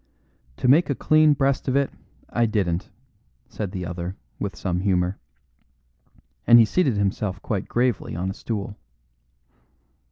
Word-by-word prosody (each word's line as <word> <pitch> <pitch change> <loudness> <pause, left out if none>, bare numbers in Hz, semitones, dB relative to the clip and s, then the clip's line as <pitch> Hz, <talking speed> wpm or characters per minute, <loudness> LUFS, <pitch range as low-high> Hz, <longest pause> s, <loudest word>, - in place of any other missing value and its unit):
"To - - -1
make 150 +7 +5
a 140 - +1
clean 155 +1 +4
breast 135 -1 0
of 130 - +1
it, 140 -1 +1 0.4
I 120 0 +1
didn't," 95 -4 -1 0.6
said 100 -4 -5
the 90 -3 -4
other, 90 +1 -5 0.2
with 100 -4 -3
some 90 -1 -2
humour. 90 -1 0 1.3
And 120 - +9
he 115 - +7
seated 130 - +1
himself 100 -1 -1
quite 100 -4 -2
gravely 120 -7 0
on 90 +3 -2
a - - -5
stool. 105 -1 -5
105 Hz, 140 wpm, -24 LUFS, 95-125 Hz, 1.3 s, And